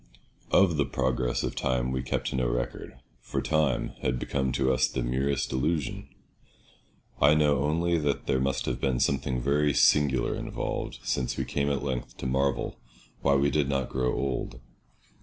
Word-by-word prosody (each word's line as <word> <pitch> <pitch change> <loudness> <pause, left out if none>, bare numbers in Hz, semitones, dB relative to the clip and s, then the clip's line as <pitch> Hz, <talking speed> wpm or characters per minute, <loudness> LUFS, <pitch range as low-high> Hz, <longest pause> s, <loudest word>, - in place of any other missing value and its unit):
Of 90 -5 +4
the 70 - +2
progress 65 -2 0
of - - -2
time 65 -1 0
we 65 0 -1
kept 65 - -2
no 65 -2 0
record, - - -4 0.2
for - - -3
time 75 -5 +1
had 65 0 0
become 65 +1 -1
to 65 0 +2
us - - +3
the 65 - -3
merest 65 +3 -1
illusion. 75 +1 -1 1.1
I 75 +2 +6
know 75 -2 +3
only 85 +4 +1
that 75 -2 -1
there 65 - +1
must 65 0 0
have - - -3
been 65 -2 +1
something 65 -2 0
very 70 +2 +1
singular 70 -3 +3
involved, - - -4
since 60 0 -1
we - - -1
came 70 0 -1
at 70 -2 -1
length 65 -3 -4
to - - -7
marvel 65 +1 0 0.4
why 70 - +3
we 70 +1 +2
did 75 -3 +1
not 70 -3 -1
grow 65 -1 0
old. 65 -3 -3
65 Hz, 170 wpm, -28 LUFS, 65-70 Hz, 1.1 s, I